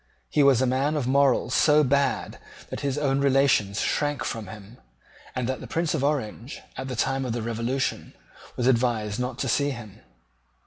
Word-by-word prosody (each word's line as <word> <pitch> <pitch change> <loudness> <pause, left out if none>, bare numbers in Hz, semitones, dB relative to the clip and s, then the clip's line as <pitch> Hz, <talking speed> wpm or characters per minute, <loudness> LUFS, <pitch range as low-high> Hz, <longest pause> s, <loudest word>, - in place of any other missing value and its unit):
He 150 - +3
was 135 -3 +5
a - - +3
man 135 +4 +1
of 140 - -1
morals 135 -2 +2
so 150 +1 +5
bad 140 +1 0 0.3
that - - -4
his 140 -1 -2
own 140 -2 +1
relations 135 -7 +2
shrank 145 -2 0
from 110 -3 -4
him, 110 +4 -12 0.6
and 125 -2 -1
that 130 0 -2
the - - -8
Prince 165 -1 -1
of 150 -4 -1
Orange, 135 -3 -2 0.2
at 130 - -5
the 130 - -4
time 135 +3 0
of 125 -3 -2
the 120 -1 -3
Revolution, 115 +3 -2 0.4
was 120 - -1
advised 115 -4 +1
not 125 0 -3
to 135 - -2
see 140 +3 +1
him. 110 -6 -8
130 Hz, 185 wpm, -25 LUFS, 115-140 Hz, 0.6 s, was